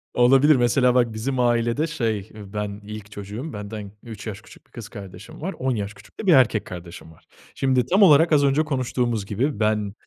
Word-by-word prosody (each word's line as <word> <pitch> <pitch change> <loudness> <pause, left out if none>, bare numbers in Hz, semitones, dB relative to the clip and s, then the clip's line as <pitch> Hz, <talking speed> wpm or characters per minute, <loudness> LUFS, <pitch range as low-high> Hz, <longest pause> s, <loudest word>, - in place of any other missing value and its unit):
Olabilir 135 +5 +5
mesela 125 0 +3
bak 120 -3 +2
bizim 125 +4 -3
ailede, 120 +5 +1
şey, 110 -10 -2
ben 105 0 -6
ilk 105 0 -9
çocuğum, 105 +9 -7
benden 105 -1 -7
3 115 -2 -9
yaş 105 -3 -5
1 105 - -17
küçük - - -18
kız 115 -3 -9
kardeşim 100 +3 -11
var, 190 +5 -3
10 130 -1 0
yaş 100 -1 -4
küçük 100 +1 -19
de - - -5
1 180 - +7
erkek 120 -6 +4
kardeşim 85 -2 -10
var. 80 - -21 0.3
Şimdi 130 -2 +1
tam 190 +4 +2
olarak 165 -1 +6
az 145 -2 +4
önce 140 +2 +3
konuştuğumuz 125 -6 -1
gibi 115 +6 -2
ben, 105 -2 0
115 Hz, 195 wpm, -23 LUFS, 105-135 Hz, 0.3 s, 1